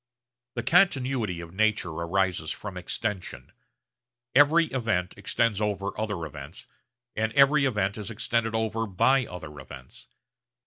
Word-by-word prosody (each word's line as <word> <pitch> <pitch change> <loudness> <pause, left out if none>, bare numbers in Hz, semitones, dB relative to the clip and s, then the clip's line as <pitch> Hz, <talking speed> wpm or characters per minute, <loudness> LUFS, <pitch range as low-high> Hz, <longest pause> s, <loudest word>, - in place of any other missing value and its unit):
The - - -2
continuity 130 - +2
of 85 0 -10
nature 110 -3 +1
arises 85 0 -1
from 105 -3 -6
extension. 95 +2 -4 0.8
Every 150 +5 +6
event 110 -8 -1
extends 105 +1 0
over 100 -1 -1
other 105 -6 -3
events, 75 +1 -10 0.5
and 110 +1 0
every 140 +1 +5
event 105 -5 0
is 105 - -4
extended 115 0 -1
over 110 0 -1
by 125 +7 +2
other 80 -5 -9
events. 65 -1 -12
105 Hz, 125 wpm, -27 LUFS, 90-115 Hz, 0.8 s, Every